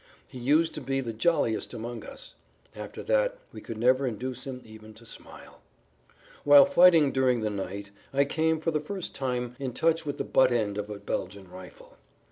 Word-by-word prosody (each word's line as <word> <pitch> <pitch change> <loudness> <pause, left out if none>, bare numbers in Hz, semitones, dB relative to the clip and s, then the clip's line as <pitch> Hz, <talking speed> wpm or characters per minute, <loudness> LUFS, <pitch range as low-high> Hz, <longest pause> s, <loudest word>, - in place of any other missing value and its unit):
He 130 - -10
used 155 +6 +2
to 150 - -6
be 135 0 -1
the 120 -4 -4
jolliest 120 -2 0
among 120 +1 -6
us; - - -10 0.4
after - - -8
that - - +1 0.2
we - - -9
could 115 - -7
never 130 +4 +3
induce 125 +3 -5
him 130 -1 -6
even 110 0 -13
to 115 - -16
smile. - - -11 0.8
Whilst 145 +6 +7
fighting 170 -6 +6
during 130 -3 +2
the 110 -1 -1
night 100 0 -6 0.2
I 140 +1 +2
came 160 +2 0
for 165 +1 -1
the 155 - 0
first 185 +4 -6
time 125 -2 -3
in 130 -3 -4
touch 165 +4 +1
with 145 -2 -4
the - - -2
butt 130 -1 +3
end 105 -4 0
of 105 0 -5
a 105 - -6
Belgian 100 -1 -5
rifle. 90 -1 -13
130 Hz, 190 wpm, -27 LUFS, 110-150 Hz, 0.8 s, Whilst